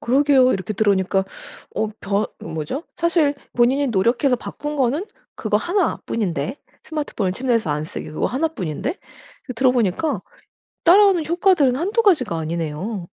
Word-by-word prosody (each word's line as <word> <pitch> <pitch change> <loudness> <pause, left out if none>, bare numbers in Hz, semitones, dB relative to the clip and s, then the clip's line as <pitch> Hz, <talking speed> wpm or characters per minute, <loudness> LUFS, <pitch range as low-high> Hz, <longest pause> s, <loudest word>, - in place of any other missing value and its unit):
그러게요. 265 0 +4
이렇게 190 +2 -3
들으니까 195 -2 +2 0.5
어 220 - 0
변 200 +2 0 0.2
으 - - -7
뭐죠? 160 - -4
사실 335 -4 +2 0.2
본인이 260 +4 +3
노력해서 240 +5 +2
바꾼 295 +5 -6
거는 280 +7 +1 0.3
그거 - - 0
1 360 0 0
뿐인데 185 - -2 0.3
스마트폰을 285 -12 -2
침대에서 230 - 0
안 150 +1 -1
쓰기 155 - -7
그거 155 - -1
1 305 +6 0
뿐인데 170 - -3
이 - - -20 0.5
그 255 - -4
들어보니까 250 - +1 0.6
따라오는 370 -2 +5
효과들은 340 -7 +3
1-2 400 - +1
가지가 265 - +3
아니네요. 170 +4 -3
250 Hz, 330 characters per minute, -21 LUFS, 190-305 Hz, 0.6 s, 따라오는